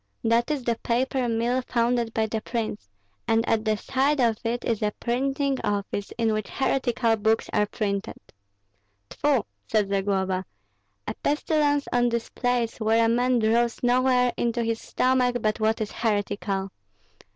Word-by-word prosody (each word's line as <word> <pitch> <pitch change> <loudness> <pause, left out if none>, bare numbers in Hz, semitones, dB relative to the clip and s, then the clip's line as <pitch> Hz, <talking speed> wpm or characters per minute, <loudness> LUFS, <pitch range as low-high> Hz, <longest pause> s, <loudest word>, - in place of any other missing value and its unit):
"That 230 +2 +2
is 295 -4 -1
the 235 -1 0
paper 250 +1 0
mill 235 +3 +1
founded 235 -1 0
by 220 0 0
the 220 0 -3
prince; 220 - -4 0.4
and 225 +1 +2
at 220 -1 +1
the 215 -1 +1
side 275 +6 0
of 230 -3 +2
it 240 +1 -2
is 225 -3 -1
a 210 - +2
printing 270 +3 0
office, 205 0 -2
in 225 -2 +1
which 215 -1 -3
heretical 245 -4 +1
books 220 +1 +1
are 210 -1 +2
printed." 200 -2 -3 0.9
"Tfu!" 280 -7 +1 0.2
said 210 -3 +1
Zagloba; 190 -1 0 0.6
"a - - -2
pestilence 290 -1 +1
on 245 0 +3
this 235 -1 -2
place, 245 -2 -1
where 225 +1 +3
a - - +2
man 245 +2 +2
draws 230 +2 +1
no 250 +2 +3
air 250 -1 +3
into 235 0 0
his 225 0 -2
stomach 255 -1 +1
but 215 -1 0
what 220 +1 +1
is 215 -1 -3
heretical! 200 -3 -1
230 Hz, 160 wpm, -25 LUFS, 215-250 Hz, 0.9 s, on